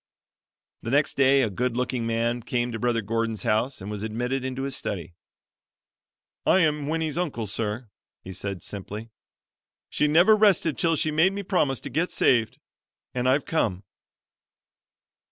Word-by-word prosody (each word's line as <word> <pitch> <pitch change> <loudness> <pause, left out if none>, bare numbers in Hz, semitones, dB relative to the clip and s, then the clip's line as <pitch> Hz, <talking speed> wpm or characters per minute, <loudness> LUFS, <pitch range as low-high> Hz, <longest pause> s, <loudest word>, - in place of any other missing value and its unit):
The - - -5
next 145 +3 +2
day 135 0 +4
a 115 - +1
good 125 +4 -1
looking 125 -2 -1
man 115 +1 0
came 120 +1 -1
to 115 - -4
Brother 115 -1 0
Gordon's 115 -1 -2
house 120 +5 0
and 100 +3 -7
was 105 -1 -4
admitted 120 +5 -2
into 130 0 -3
his 135 -1 -1
study. 85 -8 -4 1.3
"I 190 - +4
am 150 -3 +1
Winnie's 160 0 -1
uncle, 140 -11 -2
sir," 110 +3 -3 0.4
he 95 - -8
said 100 0 -5
simply. 105 +3 -7 0.8
"She 150 - +2
never 175 +8 +6
rested 195 -7 +3
till 165 -1 +2
she 155 +1 0
made 160 +5 +3
me 200 0 -4
promise 165 -9 +1
to 140 0 -7
get 165 +7 0
saved, 115 -3 +2 0.6
and 125 0 0
I've 140 +2 +2
come." 105 - -1
125 Hz, 155 wpm, -25 LUFS, 115-150 Hz, 1.3 s, never